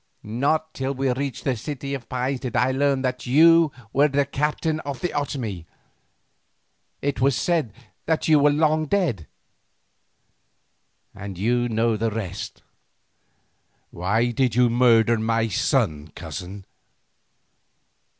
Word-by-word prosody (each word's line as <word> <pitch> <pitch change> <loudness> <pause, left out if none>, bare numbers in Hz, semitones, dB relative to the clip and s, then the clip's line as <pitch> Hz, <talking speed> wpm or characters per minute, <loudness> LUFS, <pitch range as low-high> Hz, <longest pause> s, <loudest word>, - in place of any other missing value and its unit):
Not 145 +8 -1
till 135 +1 -3
we 135 0 0
reached 135 -1 -4
the 130 - 0
City 140 +3 -5
of 135 -4 -6
Pines 130 +1 -2
did 125 -3 -5
I 125 +3 +2
learn 135 0 +1
that 125 -1 -3
you 165 +4 +6 0.2
were 145 +2 +4
the 140 0 +1
captain 150 +3 -1
of 140 -4 -6
the 180 - -2
Otomie; 115 - -4 1.4
it 140 -2 -1
was 135 -1 +3
said 165 -9 0 0.4
that 160 -1 0
you 155 -2 +5
were 145 +1 +5
long 155 +1 +2
dead. 140 - 0 1.9
You 100 +5 -1
know 115 0 +1
the 115 +1 0
rest." 105 -5 -6 1.3
"Why 110 +7 0
did 125 -1 0
you 125 -1 +4
murder 115 -2 +4
my 115 0 0
son, 75 -5 0
cousin?" 95 +2 -8
130 Hz, 125 wpm, -23 LUFS, 115-145 Hz, 1.9 s, you